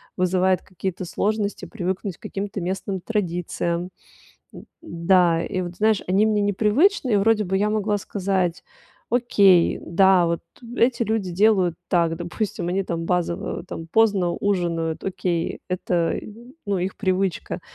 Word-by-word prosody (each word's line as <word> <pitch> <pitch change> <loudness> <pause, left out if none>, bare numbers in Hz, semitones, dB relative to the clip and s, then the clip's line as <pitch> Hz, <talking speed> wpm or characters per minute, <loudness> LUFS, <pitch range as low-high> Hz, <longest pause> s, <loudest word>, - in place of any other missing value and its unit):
вызывает 185 0 +1
какие-то 185 0 -5
сложности 205 +3 -2
привыкнуть 190 -3 -4
к - - -49
каким-то 200 +1 -4
местным 190 +1 -3
традициям. 175 -3 -2 0.6
Д - - -11 0.2
да, 170 - +2
и 185 -3 -2
вот, 175 0 -6
знаешь, 215 0 +2
они 195 +4 +3
мне 210 -1 +1
непривычны, 225 - +2
и - - +5
вроде 215 +2 +3
бы 190 +1 -1
я 210 +2 +1
могла 210 -1 0
сказать: 190 -3 -1 0.5
"Окей, 200 -7 +4
да, 185 0 +4
вот 170 0 -1 0.4
эти 240 0 +2
люди 215 -4 -1
делают 190 -3 +3
так". 170 -3 +2
Допустим, 175 +1 -3
они 190 +2 0
там 165 -3 -4
базово, 175 -1 -2
там, 165 -2 -7
поздно 200 -2 +2
ужинают, 170 -4 -1
окей, 180 -3 -2
это, 175 -2 0 0.5
ну, 200 -2 0
их 185 +2 -3
привычка. 190 -3 -1
190 Hz, 140 wpm, -23 LUFS, 175-205 Hz, 0.6 s, и